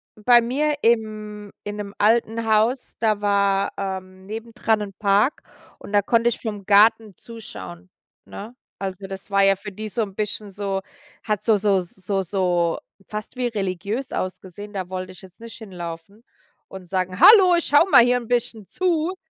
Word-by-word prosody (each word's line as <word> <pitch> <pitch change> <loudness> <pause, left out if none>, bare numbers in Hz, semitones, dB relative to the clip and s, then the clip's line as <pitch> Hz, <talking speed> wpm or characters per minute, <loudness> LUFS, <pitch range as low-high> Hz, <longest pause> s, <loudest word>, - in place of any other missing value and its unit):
bei 240 +3 +5
mir, 290 +6 0
im 215 -2 -1
in 205 0 -5
'nem 205 -1 -6
alten 225 +1 +2
Haus, 220 +4 +1
da 215 -2 +1
war, 200 -1 +1
ähm, 190 -1 -6
nebendran 225 0 -2
'n 200 -1 -6
Park 205 +6 +2 0.3
und - - -12
da 205 - +4
konnte 230 +3 +2
ich 240 - -5
vom 210 -4 -6
Garten 215 +2 +4
zuschauen, 185 -5 -11 0.4
ne? 220 +5 -10 0.2
Also 195 0 -5
das 195 +1 -9
war 200 0 +4
ja 195 0 +5
für 205 +2 -9
die 215 +3 -7
so 220 +4 -2
'n, 195 -2 -8
bisschen 210 0 -3
so 195 -1 -3 0.4
hat 210 -3 -2
so 220 -2 +3
so 200 -1 +2
so 190 +2 -3
so 175 -2 0 0.3
fast 215 +3 -7
wie 250 -1 -1
religiös 205 +3 -3
ausgesehen. 190 +2 -6
Da 185 -2 -4
wollte 185 0 -5
ich 185 - -15
jetzt 190 +3 -17
nicht 230 0 -10
hinlaufen 180 0 -9 0.5
und 190 -2 -10
sagen: 185 +1 -2
„Hallo, 385 -5 +8
ich 340 - 0
schaue 295 +6 +4
mal 245 - +8
hier 245 +1 +3
'n 240 -2 -7
bisschen 235 -4 -2
zu.“ 360 0 -1
210 Hz, 175 wpm, -22 LUFS, 195-230 Hz, 0.5 s, Hallo